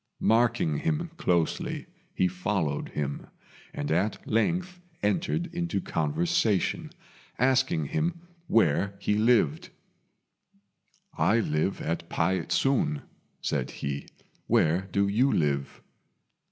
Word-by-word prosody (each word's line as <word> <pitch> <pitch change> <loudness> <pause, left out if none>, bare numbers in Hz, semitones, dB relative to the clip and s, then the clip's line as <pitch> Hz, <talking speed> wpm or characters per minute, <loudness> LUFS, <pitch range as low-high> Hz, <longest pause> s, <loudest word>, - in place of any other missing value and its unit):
Marking 115 -9 +2
him 165 +1 -1
closely, 85 -3 0 0.3
he 90 - +3
followed 90 -5 -1
him, 70 -1 -4 0.4
and 75 - -3
at 95 +7 0
length 175 - 0 0.2
entered 165 - +1
into 170 - -1
conversation, 85 +6 0 0.5
asking 130 - +2
him 170 +2 -1 0.3
where 100 -1 +2
he 100 - 0
lived. 105 - +2 1.5
"I 115 - +3
live 80 -1 0
at 85 +1 -3
Pei 90 +3 +1
ts'un," 125 - +1 0.4
said - - -1
he; 70 0 -4 0.4
"where 85 +5 +2
do 100 0 +2
you 120 +7 +3
live?" 70 -3 -1
100 Hz, 100 wpm, -28 LUFS, 80-125 Hz, 1.5 s, he